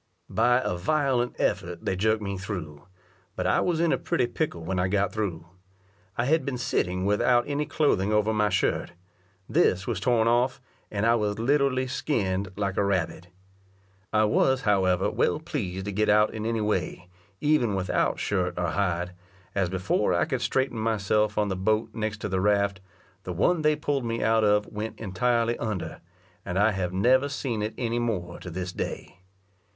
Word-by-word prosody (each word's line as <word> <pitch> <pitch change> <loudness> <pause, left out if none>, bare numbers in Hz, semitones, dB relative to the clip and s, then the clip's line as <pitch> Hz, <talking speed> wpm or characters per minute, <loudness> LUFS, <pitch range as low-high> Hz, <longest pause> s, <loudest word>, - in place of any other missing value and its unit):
By 125 +3 +3
a 90 - 0
violent 130 - +1
effort 85 0 -1
they 95 - 0
jerked 110 +3 +1
me 100 -1 -3
through; 90 -6 -6 0.5
but - - -2
I - - +3
was 170 -3 0
in 170 -1 +2
a - - +1
pretty 170 -7 0
pickle 120 - -3
when 90 +2 -2
I 90 - +2
got 100 +1 0
through. 95 -7 -3 0.7
I 115 - +1
had 160 +4 +2
been 140 -3 -3
sitting 95 -7 -1
without 120 +4 +3
any 145 +1 -1
clothing 105 -11 +1
over 105 +1 +2
my 105 -1 +2
shirt: - - 0 0.5
this 95 - +2
was 115 -7 -2
torn 115 +1 +2
off, 120 +2 +2 0.3
and 100 +1 -1
I 115 - +5
was 105 -3 0
literally 130 +1 +2
skin'd 100 -8 -1
like 100 -2 -2
a - - +3
rabbit. 95 -2 -1 0.8
I 110 0 +3
was, 130 +5 +2
however, 95 -3 +2
well 150 - +1
pleased 95 - -4
to 105 - -3
get 105 +2 +1
out 105 +1 +4
in 110 0 -3
any 115 -1 0
way, 90 -3 -2 0.3
even 135 -8 +2
without 95 -1 0
shirt 90 -3 -1
or 90 -1 0
hide; 90 -2 -1 0.4
as 95 -3 0
before 95 +1 0
I - - +2
could 135 -6 -2
straighten 125 0 0
myself 105 -1 +1
on 105 -1 +1
the 95 - -1
boat 110 +4 0
next 110 -1 -3
to - - -2
the 95 -1 -1
raft, 100 -1 +1 0.4
the 90 - -5
one 155 - +2
they 155 0 +3
pull'd 145 -3 -1
me 115 0 -2
out 110 0 +3
of 105 0 +3
went 105 +1 -6
entirely 115 +3 0
under, 110 -5 -4 0.4
and 90 -1 -3
I 105 +3 +4
have 95 -3 -2
never 130 +9 +3
seen 130 -6 -3
it 105 +1 -3
any 120 -1 -1
more 95 -8 -3
to 90 - -8
this 90 +1 -5
day. - - -5
105 Hz, 185 wpm, -26 LUFS, 95-120 Hz, 0.8 s, I